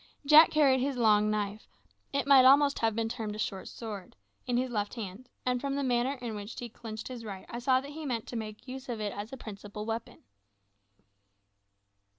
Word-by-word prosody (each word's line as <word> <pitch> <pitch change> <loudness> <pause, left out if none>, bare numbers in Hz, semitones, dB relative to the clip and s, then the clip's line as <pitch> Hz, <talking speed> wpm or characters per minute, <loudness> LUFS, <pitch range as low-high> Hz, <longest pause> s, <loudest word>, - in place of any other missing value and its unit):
Jack 305 +3 +9
carried 280 -4 +4
his 270 0 -1
long 215 -2 +4
knife 210 0 -2 0.4
it 280 0 0
might 275 -2 +7
almost 280 +2 +6
have 225 -2 +1
been 225 0 0
termed 225 -3 -4
a - - -7
short 195 -3 -3
sword 210 -5 -8 0.3
in 245 -1 +1
his 255 0 0
left 210 -1 -2
hand, 225 +2 -7 0.2
and 250 -1 0
from 275 -1 -2
the 280 - -1
manner 250 +1 +1
in 245 -4 -6
which 205 +1 -7
he 240 - -6
clinched 220 -1 -7
his 250 -3 -7
right 195 -3 -7
I 235 - -5
saw 255 +1 +3
that 280 +1 -9
he 315 +2 -7
meant 230 -4 -2
to - - -6
make 215 +1 -6
use 260 +1 -7
of 235 -2 -3
it 210 -2 -2
as 205 +2 -6
his 265 - -8
principal 210 -2 -8
weapon. 225 0 -5
235 Hz, 205 wpm, -30 LUFS, 215-260 Hz, 0.4 s, Jack